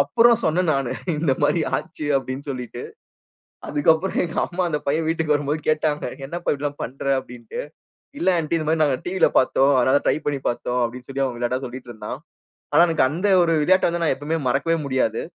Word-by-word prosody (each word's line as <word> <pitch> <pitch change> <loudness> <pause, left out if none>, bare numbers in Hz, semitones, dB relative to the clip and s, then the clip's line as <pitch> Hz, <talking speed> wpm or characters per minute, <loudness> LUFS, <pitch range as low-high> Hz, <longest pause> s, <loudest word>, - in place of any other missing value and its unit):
அப்புறம் 230 +11 +4
சொன்னேன் 170 +1 +2
நானு 135 -3 -1 0.2
இந்த 150 -3 +1
மாதிரி 160 +2 +2
ஆச்சு 150 - -6
அப்படின்னு 130 +1 -6
சொல்லிட்டு. 125 -2 -6 0.9
அதுக்கப்புறம் 160 +5 +2
எங்க - - -6
அம்மா 180 +1 -2
அந்த 150 -2 -2
பையன் 155 +3 +1
வீட்டுக்கு 160 -2 +1
வரும்போது 145 +1 -1
கேட்டாங்க. 155 -1 +1 0.2
"என்னப்பா 175 +4 -6
இப்படி 145 0 -5
எல்லாம் 145 0 -3
பண்ற." 130 +4 -8 0.2
அப்படின்னுட்டு. 120 -3 -8 0.6
"இல்ல 190 - +3
ஆண்டி 165 +1 -1
இந்த 155 - -4
மாதிரி 160 -1 +3
நாங்க 135 -3 +1
டிவி 185 +1 -3
ல - - +3
பார்த்தோம். 135 +2 +3
அதனால 130 +3 +3
ட்ரை - - +3
பண்ணி 140 -2 -1
பார்த்தோம்." 125 +1 -2
அப்படின்னு 125 +2 -8
சொல்லி 135 0 -1
அவன் 125 -2 -4
விளையாட்டா 125 +2 -1
சொல்லிட்டு 125 0 -8
இருந்தான். 110 +3 -7 0.5
ஆனா - - +6
எனக்கு 160 -5 +3
அந்த 180 +6 -1 0.2
ஒரு 165 - +2
விளையாட்டை 185 +3 +4
வந்து 170 0 -2
நான் 135 - +2
எப்பவுமே 150 +4 -2
மறக்கவே 165 +6 +1
முடியாது. 130 -5 0
145 Hz, 190 wpm, -22 LUFS, 130-165 Hz, 0.9 s, ஆனா